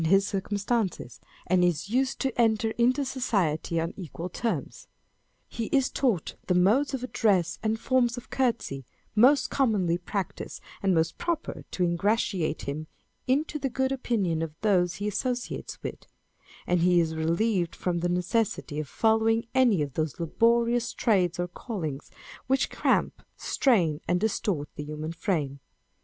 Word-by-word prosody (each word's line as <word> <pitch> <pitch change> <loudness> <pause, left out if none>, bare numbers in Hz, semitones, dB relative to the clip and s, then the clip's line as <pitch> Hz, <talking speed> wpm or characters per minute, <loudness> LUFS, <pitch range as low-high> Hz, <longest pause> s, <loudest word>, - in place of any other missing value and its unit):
299 165 +4 +5
his 195 0 0
circumstances, 200 - -2 0.3
and 180 0 +3
is 175 +3 0
used 265 +2 +1
to 265 -3 0
enter 220 -1 +2
into 255 +5 +2
society 185 - 0
on 165 +1 -2
equal 175 -1 -6
terms; 230 +6 -3 0.6
he 230 - -4
is 270 +2 +1
taught 235 - 0
the 180 - +2
modes 225 +11 +3
of 255 - -6
address 195 -8 +1
and 220 0 0
forms 245 -1 +2
of 245 - -10
courtesy 230 - -1 0.3
most 255 +6 +5
commonly 200 -10 +2
practised 190 0 -4 0.2
and 195 -2 +2
most 160 0 0
proper 340 -2 -3
to 180 - -1
ingratiate 180 -1 0
him 150 +3 -4 0.4
into 300 +4 +1
the 270 -1 -1
good 265 +2 0
opinion 210 -11 0
of 160 -2 -4
those 180 -5 +2
he 205 - -3
associates 245 +4 -3
with; - - -6 0.6
and 180 0 +2
he 175 0 +5
is 160 -1 +1
relieved 170 +3 0
from 175 -1 -1
the 175 +1 0
necessity 180 -3 -1
of 155 - -4
following 225 +1 +2
any 240 - +4
of 140 -2 -6
those 155 +1 -2
laborious 235 +7 +2
trades 190 -7 +2
or 175 - 0
callings 170 - -5 0.4
which 265 +1 +1
cramp, - - +1 0.2
strain, 175 - +2
and 180 +1 +2
distort 200 -7 -1
the 150 - -4
human 150 +1 -5
frame. 160 -6 -2
200 Hz, 150 wpm, -27 LUFS, 170-235 Hz, 0.6 s, 299